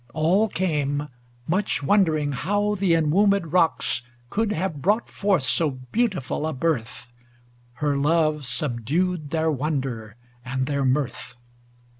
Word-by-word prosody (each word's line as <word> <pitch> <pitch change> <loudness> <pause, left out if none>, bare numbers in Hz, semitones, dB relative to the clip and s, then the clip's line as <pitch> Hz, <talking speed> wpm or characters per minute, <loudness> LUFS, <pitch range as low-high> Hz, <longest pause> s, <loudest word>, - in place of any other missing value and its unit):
All 175 +8 +3
came, 150 -5 -1 0.4
much 190 -3 0
wondering 155 -4 +2
how 205 +9 0
the 190 -4 +2
en 155 -2 +1
womb^d 200 -3 +2
rocks 165 -8 +2 0.3
Could 220 0 0
have 165 -5 -2
brought 210 - +1
forth 195 -8 +1
so 155 +4 +2
beautiful 150 - -2
a 160 - -2
birth; 125 -5 -2 0.6
Her 145 +3 -1
love 155 +1 +2
subdued 145 +6 -1
their 160 +1 +1
wonder 130 -7 -3 0.3
and 130 +1 -2
their 140 0 -1
mirth. 130 -2 -1
155 Hz, 125 wpm, -24 LUFS, 135-185 Hz, 0.6 s, All